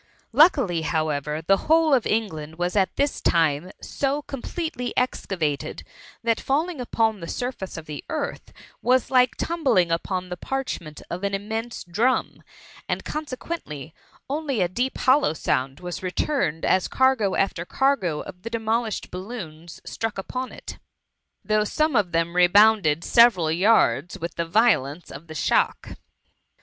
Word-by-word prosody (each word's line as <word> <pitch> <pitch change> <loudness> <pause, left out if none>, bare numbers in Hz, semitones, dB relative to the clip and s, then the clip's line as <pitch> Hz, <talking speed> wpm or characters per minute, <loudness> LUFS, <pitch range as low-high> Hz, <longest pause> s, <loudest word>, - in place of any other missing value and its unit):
Lucidly^ 260 - +4
however, 155 -1 -1
the 195 +4 +4
whole 320 -2 +5
of 250 -4 +3
England 160 -9 -2
was 175 +2 -1
at 195 -2 +2
this 285 +1 0
time 160 0 +2
so 285 +1 -1
completely 275 -1 -5
excavated, 175 - -1 0.4
that 230 -1 +1
falling 305 +2 -1
upon 225 -3 0
the 170 - -7
surface 245 -7 -4
of 160 - -7
the 150 -2 -7
earth 295 -3 -4 0.3
was 255 0 +2
like 250 -2 +4
tumbling 270 - +1
upon 180 +2 -2
the 180 - -4
parchment 175 - -5
of 180 +3 -4
an 200 0 0
immense 220 +4 -4
drum, 220 +9 0 0.5
and - - -2
consequently 255 - -6 0.3
only 280 -3 -2
a 180 - +3
deep 245 +9 -2
hollow 265 - +3
sound 135 -3 -1
was 180 -1 -6
returned 185 - -1
as 185 - +2
cargo 260 -7 +2
after 190 -3 0
cargo 190 - 0
of 180 - -10
the 230 - -6
demolished 225 -1 -2
balloons 180 -5 -8
struck 225 -2 -4
upon 255 +7 -4
it; - - -9 0.7
though 215 0 +2
some 305 +6 0
of 200 -5 +2
them 165 +1 0
rebounded 180 -3 +5
several 220 -10 +5
yards 180 -3 +3
with 170 +1 -5
the 170 - -2
violence 175 - +2
of 145 +5 -10
the 160 - -9
shock. - - +1
205 Hz, 145 wpm, -24 LUFS, 170-255 Hz, 0.7 s, whole